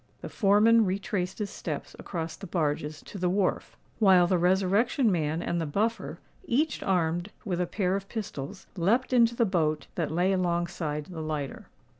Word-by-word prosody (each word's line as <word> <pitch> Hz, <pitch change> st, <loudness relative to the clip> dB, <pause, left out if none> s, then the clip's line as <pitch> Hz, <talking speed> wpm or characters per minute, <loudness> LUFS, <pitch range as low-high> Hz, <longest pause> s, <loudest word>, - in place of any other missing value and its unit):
The -, -, -6 dB
foreman 215 Hz, +3 st, +4 dB
retraced 190 Hz, -1 st, -2 dB
his 210 Hz, -2 st, -3 dB
steps 150 Hz, -4 st, -5 dB
across 165 Hz, -3 st, -4 dB
the 195 Hz, -, -9 dB
barges 155 Hz, -2 st, -2 dB
to 200 Hz, -, -8 dB
the 180 Hz, 0 st, +1 dB
wharf; 190 Hz, 0 st, -1 dB, 0.2 s
while 190 Hz, -5 st, +6 dB
the 180 Hz, 0 st, +2 dB
Resurrection 195 Hz, +7 st, +2 dB
Man 160 Hz, -1 st, -1 dB
and 170 Hz, 0 st, -1 dB
the 160 Hz, -, -2 dB
Buffer, 220 Hz, +9 st, -1 dB, 0.3 s
each 300 Hz, +4 st, 0 dB
armed 175 Hz, -1 st, 0 dB, 0.2 s
with 180 Hz, -3 st, -1 dB
a 180 Hz, -, 0 dB
pair 185 Hz, 0 st, 0 dB
of 195 Hz, 0 st, -5 dB
pistols, 190 Hz, -5 st, -6 dB
leapt 225 Hz, +9 st, +1 dB
into 235 Hz, -1 st, +4 dB
the 235 Hz, -, +3 dB
boat, 155 Hz, -6 st, 0 dB
that 165 Hz, -4 st, -2 dB
lay 180 Hz, +4 st, +1 dB
alongside 170 Hz, -4 st, -1 dB
the 170 Hz, -2 st, -7 dB
lighter. 150 Hz, -4 st, -4 dB
180 Hz, 170 wpm, -28 LUFS, 165-205 Hz, 0.3 s, while